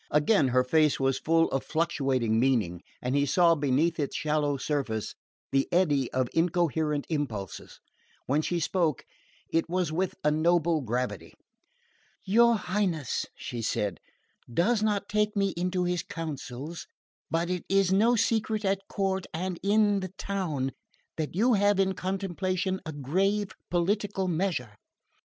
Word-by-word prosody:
Again 150 +1 +3
her 125 0 +3
face 150 +3 +3
was 135 -1 +1
full 165 +1 +3
of 135 - -1
fluctuating 135 -8 0
meaning; 110 -10 +1 0.2
and 125 +2 0
he 140 0 +2
saw, 170 +4 +5
beneath 150 +3 +1
its 145 - -2
shallow 150 -2 0
surface, 130 -7 -2 0.4
the 135 0 +1
eddy 145 -8 +2
of 130 -1 0
incoherent 160 -3 +1
impulses. 130 - -4 0.5
When 145 +4 +1
she 175 +2 -1
spoke, 165 -4 0 0.5
it 165 0 +1
was 180 -2 0
with 180 +3 -1
a 150 - +3
noble 165 0 +2
gravity. 125 +1 -3 0.9
"Your 235 +4 +5
Highness," 180 - -1
she 120 - -6
said, 105 -3 -1 0.5
"does 205 - +2
not 205 -2 0
take 210 0 0
me 200 -1 +2
into 180 +1 -1
your 180 0 0
counsels; 155 -1 -6 0.4
but 170 +2 0
it 180 -2 -2
is 195 -1 +3
no 225 +5 +4
secret 220 -1 0
at 195 0 0
court 190 -1 -1
and 180 +1 -3
in 205 0 +3
the 185 -2 -5
town 160 -10 -2 0.5
that 155 0 -3
you 235 +6 +3
have 205 -1 +3
in 190 0 +2
contemplation 190 0 -2
a - - -3
grave 190 +9 0 0.2
political 195 +2 0
measure." 170 - -1
170 Hz, 145 wpm, -28 LUFS, 140-195 Hz, 0.9 s, saw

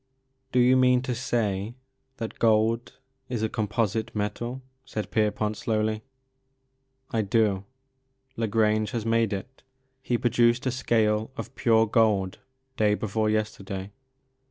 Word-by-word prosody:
*' 130 0 -47
'' 130 0 -47
Do - - 0
you 125 +1 +6
mean 125 -1 +4
to 130 - -2
say 115 -3 -1 0.4
that 115 -2 -6
gold 115 +1 +2 0.3
is 120 -3 -2
a 110 - +1
composite 110 0 -1
metal 120 +5 -3
?*' 130 0 -46
said 105 - -5
Pierpont 105 0 +1
slowly. 110 -1 0 0.4
' 130 0 -47
' 130 0 -38
I 115 - +1
do. 100 -2 +1 0.7
La 115 -1 -1
Grange 110 0 +2
has 115 -2 -2
made 115 -1 +2
it. 100 +7 -6 0.4
He 125 -2 0
produced 120 +1 +2
a 130 - +1
scale 110 -4 +1
of - - -6
pure 115 -3 +3
gold 105 -4 +2 0.4
day 105 -1 +3
before 110 +1 -1
yesterday. 100 -2 -3
110 Hz, 150 wpm, -26 LUFS, 105-125 Hz, 0.7 s, you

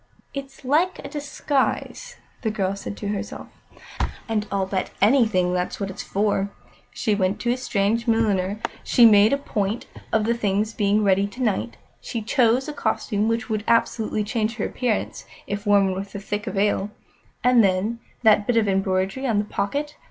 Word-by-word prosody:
"It's 270 -1 -8
like 325 +8 +2
a - - -8
disguise," 295 - -2 0.3
the 225 - 0
girl 200 -3 -1
said 200 0 -7
to 205 - -4
herself, 205 -1 -5 0.8
"and 215 -2 -1
I'll 195 -1 0
bet 190 0 -2
anything 205 -6 +3
that's 180 0 -2
what 195 -1 -3
it's - - -7
for. 200 -1 0 0.4
She 215 - 0
went 195 -1 0
to 240 - +1
a 245 - 0
strange 230 -1 0
milliner; 210 -3 +1 0.2
she 240 - +5
made 210 -1 +7
a 280 - +3
point 215 -5 -2 0.3
of 220 -1 +2
the 235 - +2
things 210 -1 0
being 210 0 +2
ready 195 0 +3
to 245 +5 -6
night; 220 +1 -1 0.2
she 230 -2 -4
chose 240 +2 +2
a 300 - -4
costume 210 -6 -1
which 230 0 -1
would 215 -2 -2
absolutely 220 -2 +1
change 220 +1 -1
her 220 - -2
appearance, 245 -4 -2 0.2
if 205 +1 -4
worn 200 -2 +4
with 195 +2 -6
a - - -3
thick 210 +2 -4
veil. 200 0 0 0.5
And 245 -2 +5
then 200 +4 +1 0.2
that 210 -2 +5
bit 245 - +2
of 220 -2 +3
embroidery 195 +6 0
on 225 -4 +1
the 205 - +1
pocket! 285 +10 -3
210 Hz, 175 wpm, -23 LUFS, 200-235 Hz, 0.8 s, made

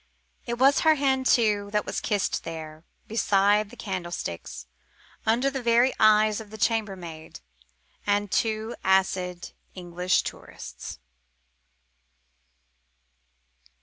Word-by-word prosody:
It 235 0 -2
was 270 +3 +5
her 315 -1 +4
hand, 265 -2 +1
too, 210 -4 +2
that 210 - +1
was - - -3
kissed 205 -3 -1
there, 160 -1 -8 0.2
beside 205 -1 +2
the 245 - -13
candlesticks, 175 - -5 0.6
under 245 +5 +2
the 270 -1 -4
very 240 +2 +3
eyes 215 0 +4
of 215 - -12
the 220 - -9
chambermaid 190 -8 -3 0.7
and 205 -1 +1
two 220 +1 -1
acid 185 -2 0 0.2
English 180 0 0
tourists. - - -8
210 Hz, 105 wpm, -26 LUFS, 185-235 Hz, 0.7 s, was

